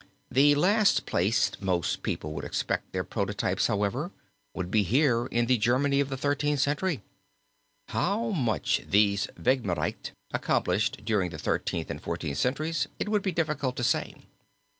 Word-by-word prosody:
The 145 +3 +5
last 200 +7 +3
place 100 +7 +2
most 90 -5 0
people 75 0 -3
would - - -5
expect - - -2
their - - -1
prototypes, - - -1
however, 105 - -1 0.5
would 90 -1 -4
be 110 - +4
here 120 - +2
in 120 0 +1
the 125 -1 +2
Germany 135 +5 +2
of 140 -1 +1
the 135 - -3
Thirteenth 145 +1 0
Century. 145 - 0 0.9
How 215 +5 0
much 120 - 0
these 100 0 +3
Vehmgerichte 120 -9 -1 0.2
accomplished 100 +3 0
during 105 -5 +1
the - - -8
Thirteenth - - -2
and - - -6
Fourteenth 70 -2 -3
centuries 145 +3 0
it - - -2
would 210 -1 +2
be 190 - -1
difficult 155 -6 -1
to 120 - -3
say. - - 0
130 Hz, 150 wpm, -28 LUFS, 105-150 Hz, 0.9 s, The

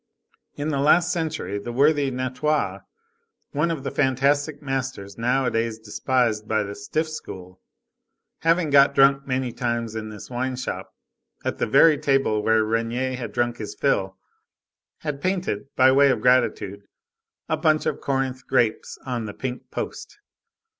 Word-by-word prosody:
In 145 +1 -3
the 140 -3 -1
last 165 +5 +4
century, 155 - -2
the 120 +4 -6
worthy 145 +2 +3
Natoire, 130 +4 -1 0.7
one 150 +4 0
of 160 -5 -3
the - - -3
fantastic 145 +2 +1
masters 130 -8 -4
nowadays 115 -2 0
despised 110 0 -1
by 110 -1 +1
the 100 0 -6
stiff 155 +7 -2
school, 95 -11 -9 0.8
having 165 -1 +2
got 140 0 +6
drunk 135 0 +4
many 130 -1 -1
times 115 -2 -2
in 110 -1 -5
this 105 -1 -9
wine 130 +1 -2
shop 125 - -5 0.5
at - - -2
the - - 0
very 145 +6 +5
table 135 -7 +1
where 110 0 +3
Regnier 115 +4 -1
had 125 -1 -6
drunk 120 0 -1
his 105 -2 -6
fill, 95 -9 0 0.8
had 145 -3 -4
painted, 180 - -1
by 130 0 +6
way 140 +1 +5
of 125 - +1
gratitude, 110 -5 +2 0.7
a - - +1
bunch 155 -1 +2
of - - -2
Corinth 130 -1 -2
grapes 115 -2 0
on 120 -4 -3
the 105 - -7
pink 130 -2 -5
post. - - -6
130 Hz, 150 wpm, -24 LUFS, 115-140 Hz, 0.8 s, got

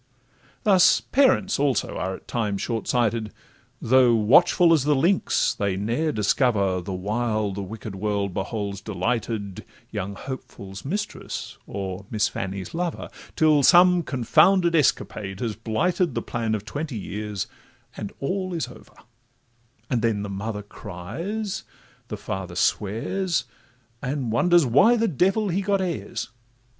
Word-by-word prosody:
Thus 190 -5 +5
parents 255 - +2
also 140 -2 0
are 95 +1 -2
at - - -15
times 105 -4 -1
short 115 -2 -3
sighted; 115 -3 0 0.5
Though 125 -1 +4
watchful 165 +10 +5
as 155 -5 +3
the 150 +1 +3
lynx, 175 +8 +2
they 100 -2 -1
ne'er 120 +10 0
discover, 100 -4 +1
The 90 - -6
while 105 +2 -1
the 100 +1 -5
wicked 105 +1 -7
world 100 -1 -2
beholds 100 0 -3
delighted, 105 0 -3 0.3
Young 100 -2 -4
Hopeful's 100 -6 -8
mistress, 205 +9 -5
or 95 0 -5
Miss 105 -1 +1
Fanny's 95 0 -5
lover, 175 0 -3 0.3
Till 155 -2 +4
some 180 +4 +6
confounded 170 +7 +3
escapade 100 - 0
has 115 -3 -2
blighted 155 - 0
The - - -2
plan 115 -2 -1
of 105 -1 -6
twenty 145 -2 -4
years, 105 -1 -4 0.5
and 100 - -6
all 185 +5 -2
is 160 - -2
over; 125 - -15 0.9
And 125 -6 0
then 110 -3 0
the 105 - -5
mother 105 +1 -4
cries, 135 - -5 0.4
the 105 - -5
father 95 -3 -5
swears, 145 - 0 0.6
And 130 -3 -2
wonders 175 +7 +4
why 145 - +5
the 230 0 +2
devil 195 - +1
he 185 +3 0
got 200 0 +1
heirs. 165 - -3
115 Hz, 135 wpm, -24 LUFS, 100-165 Hz, 0.9 s, some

